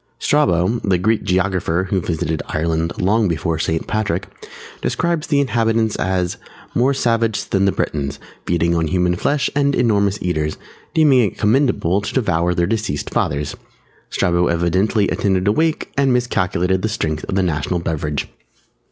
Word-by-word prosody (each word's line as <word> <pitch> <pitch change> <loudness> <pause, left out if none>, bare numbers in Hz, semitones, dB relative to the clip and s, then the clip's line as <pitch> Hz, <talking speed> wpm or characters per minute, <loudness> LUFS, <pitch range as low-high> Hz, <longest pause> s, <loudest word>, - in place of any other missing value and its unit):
Strabo, 105 - +2
the 95 -4 +1
Greek 110 +5 +1
Geographer 90 -1 0
who 95 -2 +1
visited 80 -2 -2
Ireland 80 +1 -1
long 105 +4 +2
before 80 -1 -1
St. 80 0 -1
Patrick, 100 -4 -1 0.6
describes 170 -3 -1
the 145 -2 +2
inhabitants 115 -4 +1
as, 90 -2 -1 0.4
"_more 130 +3 +3
savage 115 -4 0
than 95 0 +2
the 100 - +3
Britons, 70 -5 -3 0.3
feeding 85 0 +1
on 85 -1 +1
human 90 +2 +1
flesh 140 +10 0
and 140 -1 +2
enormous 100 -4 +2
eaters, 80 -4 -2 0.4
deeming 150 -5 +5
it - - -18
commendable 105 - +2
to 105 - -5
devour 90 -8 +1
their 85 - +2
deceased 100 -8 -2
fathers_." 70 0 -1 0.6
Strabo 85 0 +1
evidently 95 +5 +1
attended 95 -1 0
a - - +5
wake 160 +7 0
and 140 -1 +2
miscalculated 95 -7 0
the 110 - -1
strength 80 -7 -2
of - - -3
the 95 - +2
national 85 0 -1
beverage. 75 -3 -2
95 Hz, 150 wpm, -19 LUFS, 85-115 Hz, 0.6 s, deeming